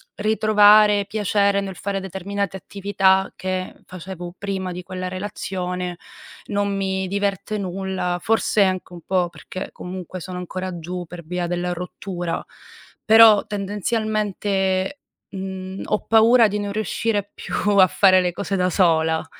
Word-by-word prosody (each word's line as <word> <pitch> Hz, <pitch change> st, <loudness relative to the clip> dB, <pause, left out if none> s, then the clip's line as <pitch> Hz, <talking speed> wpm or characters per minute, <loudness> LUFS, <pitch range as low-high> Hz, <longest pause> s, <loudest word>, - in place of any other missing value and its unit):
ritrovare 210 Hz, -1 st, +5 dB
piacere 200 Hz, -1 st, +1 dB
nel 195 Hz, -2 st, -5 dB
fare 200 Hz, -1 st, -3 dB
determinate 195 Hz, +1 st, -4 dB
attività 195 Hz, 0 st, +1 dB
che 185 Hz, 0 st, -3 dB
facevo 180 Hz, -1 st, -8 dB
prima 190 Hz, -2 st, -3 dB
di 180 Hz, 0 st, -6 dB
quella 185 Hz, 0 st, -5 dB
relazione. 180 Hz, -2 st, -4 dB, 0.5 s
Non 200 Hz, -1 st, -1 dB
mi 190 Hz, -1 st, -1 dB
diverte 200 Hz, +1 st, -2 dB
nulla, 185 Hz, -2 st, -3 dB
forse 220 Hz, -1 st, +2 dB
anche 185 Hz, -1 st, -1 dB
un 170 Hz, -, -9 dB
po' 180 Hz, 0 st, 0 dB
perché 185 Hz, -, -8 dB
comunque 185 Hz, 0 st, -7 dB
sono 180 Hz, +1 st, -7 dB
ancora 185 Hz, 0 st, -5 dB
giù 175 Hz, +2 st, -5 dB
per 170 Hz, 0 st, -9 dB
via 175 Hz, +1 st, -2 dB
della 175 Hz, 0 st, -2 dB
rottura. 175 Hz, -1 st, -5 dB, 0.6 s
Però, 220 Hz, -1 st, +7 dB
tendenzialmente, 205 Hz, 0 st, -1 dB, 0.3 s
mhmm, 190 Hz, -1 st, -6 dB
ho 210 Hz, -, -1 dB
paura 225 Hz, +1 st, +6 dB
di 210 Hz, +1 st, -2 dB
non 205 Hz, -1 st, -3 dB
riuscire 210 Hz, -1 st, -1 dB
più -, -, -6 dB, 0.2 s
a 185 Hz, -1 st, +8 dB
fare 185 Hz, 0 st, +5 dB
le 180 Hz, -1 st, 0 dB
cose 200 Hz, +1 st, -3 dB
da 180 Hz, 0 st, +1 dB
sola, 160 Hz, -3 st, +2 dB
190 Hz, 135 wpm, -22 LUFS, 180-205 Hz, 0.6 s, a